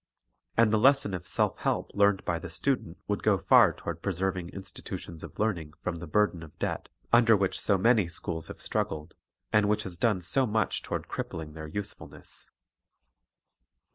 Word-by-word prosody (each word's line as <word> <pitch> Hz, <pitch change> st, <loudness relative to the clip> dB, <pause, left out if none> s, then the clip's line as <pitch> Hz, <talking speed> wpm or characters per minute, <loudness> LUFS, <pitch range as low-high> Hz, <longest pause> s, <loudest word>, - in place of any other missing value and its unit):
And 115 Hz, -2 st, +5 dB
the 110 Hz, -, +4 dB
lesson 135 Hz, -4 st, +4 dB
of 90 Hz, -2 st, -5 dB
self -, -, 0 dB
help -, -, -1 dB
learned 100 Hz, -1 st, +3 dB
by 85 Hz, -1 st, 0 dB
the 85 Hz, -, -7 dB
student 90 Hz, 0 st, -2 dB
would 105 Hz, -1 st, -1 dB
go -, -, +3 dB
far -, -, +6 dB
toward -, -, -6 dB
preserving 95 Hz, -1 st, -1 dB
institutions 95 Hz, -3 st, -7 dB
of -, -, -10 dB
learning 85 Hz, -9 st, -1 dB
from 90 Hz, -2 st, -2 dB
the 85 Hz, +1 st, -8 dB
burden 100 Hz, 0 st, +2 dB
of 80 Hz, -2 st, -12 dB
debt -, -, -3 dB, 0.2 s
under 115 Hz, -2 st, +6 dB
which 95 Hz, -1 st, -1 dB
so 100 Hz, -, +3 dB
many 110 Hz, -1 st, +4 dB
schools 80 Hz, 0 st, -3 dB
have -, -, -10 dB
struggled, 75 Hz, +1 st, -3 dB, 0.4 s
and 105 Hz, -1 st, +4 dB
which 105 Hz, 0 st, +1 dB
has 90 Hz, -3 st, -4 dB
done 110 Hz, -5 st, +2 dB
so 125 Hz, +10 st, +3 dB
much 110 Hz, -1 st, 0 dB
toward -, -, -4 dB
crippling 80 Hz, -2 st, -5 dB
their 80 Hz, 0 st, -7 dB
usefulness. 100 Hz, +6 st, -7 dB
95 Hz, 170 wpm, -29 LUFS, 85-105 Hz, 0.4 s, far